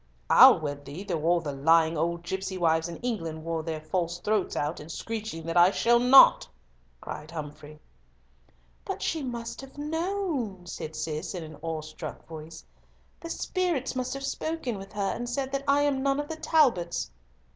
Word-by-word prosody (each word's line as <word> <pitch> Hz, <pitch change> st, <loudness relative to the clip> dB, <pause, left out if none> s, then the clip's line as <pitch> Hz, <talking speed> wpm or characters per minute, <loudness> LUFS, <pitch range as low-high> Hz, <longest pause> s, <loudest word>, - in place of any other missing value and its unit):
"I'll -, -, +9 dB
wed 145 Hz, -2 st, -4 dB
thee 145 Hz, +7 st, -8 dB
though 175 Hz, -6 st, -2 dB
all 175 Hz, 0 st, +3 dB
the 150 Hz, -3 st, -4 dB
lying 160 Hz, +4 st, +3 dB
old 170 Hz, +2 st, -1 dB
gipsy 190 Hz, +1 st, -4 dB
wives 165 Hz, -1 st, +2 dB
in 170 Hz, -, -6 dB
England 165 Hz, -10 st, -3 dB
wore 165 Hz, -1 st, -2 dB
their 160 Hz, -1 st, -4 dB
false 170 Hz, +2 st, -2 dB
throats 205 Hz, +3 st, -1 dB
out 150 Hz, +3 st, -2 dB
in 150 Hz, -, -10 dB
screeching 215 Hz, -1 st, -5 dB
out -, -, -12 dB
that 165 Hz, +1 st, -1 dB
I 175 Hz, +1 st, +8 dB
shall 235 Hz, +4 st, +3 dB
not," 250 Hz, +2 st, +7 dB, 0.5 s
cried 150 Hz, -, -8 dB
Humfrey. 150 Hz, -1 st, -8 dB, 1.0 s
"But -, -, -5 dB
she 320 Hz, -, -1 dB
must 235 Hz, -3 st, -5 dB
have 270 Hz, +1 st, -13 dB
known," 305 Hz, -, -2 dB
said 160 Hz, -2 st, -7 dB
Cis, 155 Hz, +4 st, -4 dB
in 175 Hz, -, -5 dB
an 155 Hz, -1 st, -10 dB
awestruck 155 Hz, -1 st, -6 dB
voice; 160 Hz, 0 st, -10 dB, 0.5 s
"the 335 Hz, -, -8 dB
spirits 340 Hz, -8 st, -1 dB
must 255 Hz, +1 st, -2 dB
have 275 Hz, 0 st, -4 dB
spoken 275 Hz, -9 st, -3 dB
with 195 Hz, 0 st, -10 dB
her, 200 Hz, -2 st, -1 dB
and 240 Hz, 0 st, -4 dB
said 265 Hz, +1 st, -2 dB
that 275 Hz, 0 st, -2 dB
I 285 Hz, +1 st, +4 dB
am 280 Hz, -2 st, +1 dB
none 275 Hz, +1 st, +1 dB
of 290 Hz, -, -4 dB
the 320 Hz, -, -5 dB
Talbots." 185 Hz, -, +2 dB
185 Hz, 180 wpm, -27 LUFS, 160-265 Hz, 1.0 s, I'll